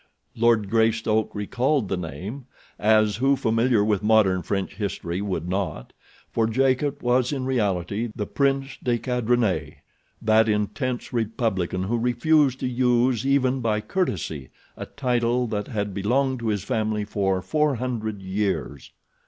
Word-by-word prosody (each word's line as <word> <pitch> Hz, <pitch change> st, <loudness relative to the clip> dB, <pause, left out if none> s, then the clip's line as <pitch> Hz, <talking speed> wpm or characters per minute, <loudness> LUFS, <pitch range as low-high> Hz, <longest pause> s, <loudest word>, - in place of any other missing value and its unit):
Lord 115 Hz, -3 st, +3 dB
Greystoke 110 Hz, 0 st, +1 dB
recalled 125 Hz, +4 st, 0 dB
the 95 Hz, -, -1 dB
name, 100 Hz, -, -6 dB, 0.3 s
as 110 Hz, -1 st, +3 dB
who 135 Hz, +3 st, +3 dB
familiar 115 Hz, -2 st, +2 dB
with 105 Hz, -3 st, +1 dB
modern 105 Hz, -4 st, +3 dB
French 95 Hz, +2 st, -2 dB
history 100 Hz, -3 st, -3 dB
would 90 Hz, -5 st, -3 dB
not, 90 Hz, -9 st, -3 dB, 0.4 s
for 115 Hz, -1 st, +1 dB
Jacot 135 Hz, +4 st, +1 dB
was 125 Hz, +1 st, +2 dB
in 135 Hz, -3 st, -2 dB
reality 105 Hz, -3 st, -1 dB
the 105 Hz, -, -3 dB
Prince 135 Hz, +2 st, -1 dB
de 120 Hz, -1 st, +1 dB
Cadrenet—that 110 Hz, -, 0 dB
intense 120 Hz, +5 st, -2 dB
republican 110 Hz, -6 st, -1 dB
who 115 Hz, +5 st, -1 dB
refused 130 Hz, +3 st, +2 dB
to -, -, 0 dB
use, 125 Hz, 0 st, +2 dB
even 135 Hz, -1 st, +2 dB
by 110 Hz, -2 st, +1 dB
courtesy, 95 Hz, -, -3 dB, 0.3 s
a -, -, -7 dB
title 125 Hz, -1 st, 0 dB
that 105 Hz, -3 st, -3 dB
had 105 Hz, -4 st, -3 dB
belonged 130 Hz, +7 st, 0 dB
to 115 Hz, -, -4 dB
his 105 Hz, -3 st, -1 dB
family 110 Hz, -1 st, -1 dB
for 95 Hz, -2 st, 0 dB
four 150 Hz, -2 st, +1 dB
hundred 110 Hz, -5 st, -4 dB
years. 95 Hz, -8 st, -3 dB
110 Hz, 135 wpm, -24 LUFS, 105-125 Hz, 0.4 s, Lord